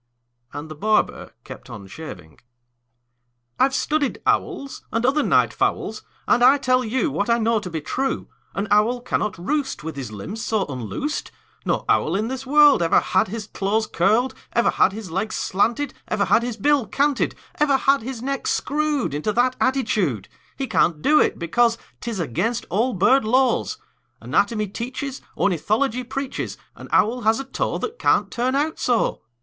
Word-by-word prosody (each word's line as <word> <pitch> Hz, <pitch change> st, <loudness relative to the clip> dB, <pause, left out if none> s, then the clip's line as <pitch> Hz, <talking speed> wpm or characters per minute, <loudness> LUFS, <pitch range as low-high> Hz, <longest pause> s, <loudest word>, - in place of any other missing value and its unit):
And 145 Hz, +2 st, -7 dB
the 155 Hz, -, -7 dB
barber 215 Hz, +8 st, 0 dB
kept -, -, -11 dB
on 100 Hz, -2 st, -9 dB
shaving. 95 Hz, -, -10 dB, 1.2 s
"I've 270 Hz, 0 st, +3 dB
studied 300 Hz, -2 st, 0 dB
owls, 360 Hz, -9 st, -1 dB
And 230 Hz, +2 st, 0 dB
other 280 Hz, +4 st, +3 dB
night -, -, +3 dB
fowls, -, -, -1 dB, 0.3 s
And 245 Hz, -, +4 dB
I 270 Hz, +3 st, +7 dB
tell 255 Hz, -2 st, +2 dB
you 260 Hz, +6 st, 0 dB
What 205 Hz, -2 st, -1 dB
I 235 Hz, -, +4 dB
know 225 Hz, -1 st, +2 dB
to 190 Hz, -, -7 dB
be 160 Hz, -2 st, -4 dB
true: 265 Hz, -, -2 dB, 0.3 s
An 200 Hz, +2 st, -2 dB
owl 220 Hz, +4 st, +3 dB
cannot 215 Hz, -5 st, -2 dB
roost 265 Hz, -, -2 dB
With 160 Hz, -1 st, -5 dB
his 130 Hz, -5 st, -6 dB
limbs 190 Hz, -, -6 dB
so 215 Hz, -3 st, 0 dB
unloosed; 135 Hz, -, -4 dB, 0.4 s
No -, -, 0 dB
owl -, -, +2 dB
in 215 Hz, +3 st, -1 dB
this 265 Hz, 0 st, -5 dB
world 295 Hz, -4 st, +6 dB
Ever 165 Hz, -, +4 dB
had 190 Hz, -, +1 dB
his 215 Hz, +2 st, -5 dB
claws 215 Hz, +1 st, -1 dB
curled, 220 Hz, +9 st, +2 dB, 0.2 s
Ever 235 Hz, -, +3 dB
had -, -, +3 dB
his 200 Hz, -3 st, -8 dB
legs 195 Hz, +5 st, -2 dB
slanted, 235 Hz, +8 st, 0 dB
Ever 205 Hz, -2 st, 0 dB
had -, -, +4 dB
his 240 Hz, -1 st, -4 dB
bill 280 Hz, +1 st, +2 dB
canted, 285 Hz, -1 st, +1 dB, 0.2 s
Ever 290 Hz, -2 st, +4 dB
had 275 Hz, 0 st, +3 dB
his 245 Hz, 0 st, -6 dB
neck 275 Hz, 0 st, -2 dB
screwed 295 Hz, -, 0 dB
Into 150 Hz, +9 st, -1 dB
that 250 Hz, +3 st, +2 dB
attitude. 215 Hz, -, 0 dB, 0.3 s
He 270 Hz, -, -2 dB
can't 170 Hz, -10 st, +1 dB
do 305 Hz, 0 st, +5 dB
it, -, -, +2 dB
because 230 Hz, +8 st, +2 dB, 0.2 s
'T -, -, -5 dB
is 220 Hz, -4 st, -4 dB
against 180 Hz, -, -1 dB
all 230 Hz, +7 st, +1 dB
bird 250 Hz, +8 st, +4 dB
laws. 255 Hz, -, +2 dB, 0.4 s
Anatomy 215 Hz, -3 st, +1 dB
teaches, 255 Hz, +6 st, -5 dB, 0.2 s
Ornithology 220 Hz, -, +1 dB
preaches 270 Hz, +2 st, -4 dB, 0.2 s
An -, -, -11 dB
owl 240 Hz, +4 st, +2 dB
has 220 Hz, +1 st, +2 dB
a -, -, -3 dB
toe 270 Hz, -, -2 dB
That 460 Hz, +2 st, -5 dB
can't -, -, +2 dB
turn 255 Hz, +2 st, 0 dB
out 300 Hz, +3 st, 0 dB
so! 240 Hz, -2 st, +1 dB
235 Hz, 175 wpm, -22 LUFS, 200-270 Hz, 1.2 s, I